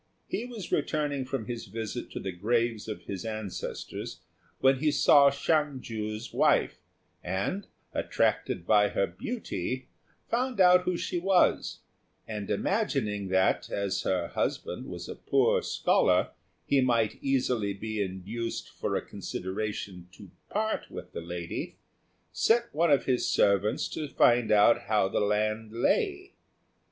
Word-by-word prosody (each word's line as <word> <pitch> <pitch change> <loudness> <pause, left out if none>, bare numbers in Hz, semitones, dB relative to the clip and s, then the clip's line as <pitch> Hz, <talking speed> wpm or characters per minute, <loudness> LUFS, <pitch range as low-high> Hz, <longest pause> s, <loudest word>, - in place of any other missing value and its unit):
He 225 - -3
was 235 -7 -8
returning 145 -3 0
from 130 -3 -3
his 120 +1 -5
visit 110 -1 -5
to - - -6
the 95 - -4
graves 115 +4 0
of 110 - -6
his 95 -2 -5
ancestors 110 -4 -5 0.4
when 135 0 +4
he 155 +2 +2
saw 140 -1 +6
Hsiang 145 0 0
ju's 110 0 -5
wife, - - +3 0.4
and, 95 - -2 0.3
attracted 85 - 0
by 105 0 +4
her 100 - +1
beauty, 130 - -4 0.4
found 245 -1 -1
out 180 0 +6
who 180 -1 0
she 175 - -2
was; 185 0 +2 0.5
and 105 -2 -5
imagining 105 -2 0
that, 95 0 +2
as 100 -2 -1
her 90 -3 -1
husband - - -2
was - - -7
a - - -5
poor - - +2
scholar, 90 0 +2 0.3
he 140 -1 +3
might 120 -4 +1
easily 125 -6 +1
be 110 +2 -4
induced 100 +5 -4
for - - -3
a - - -2
consideration 95 -2 -5
to 100 -2 -13 0.2
part 220 +1 -1
with - - -9
the - - -4
lady, 85 0 -5 0.6
sent 235 +1 +2
one 165 +2 +2
of 140 -2 +4
his 125 -2 +1
servants 100 +1 +2
to 155 - -4
find 120 -3 +3
out 105 +1 +5
how 105 -2 +3
the - - -1
land 110 +1 0
lay. 380 - 0
115 Hz, 140 wpm, -29 LUFS, 100-145 Hz, 0.6 s, saw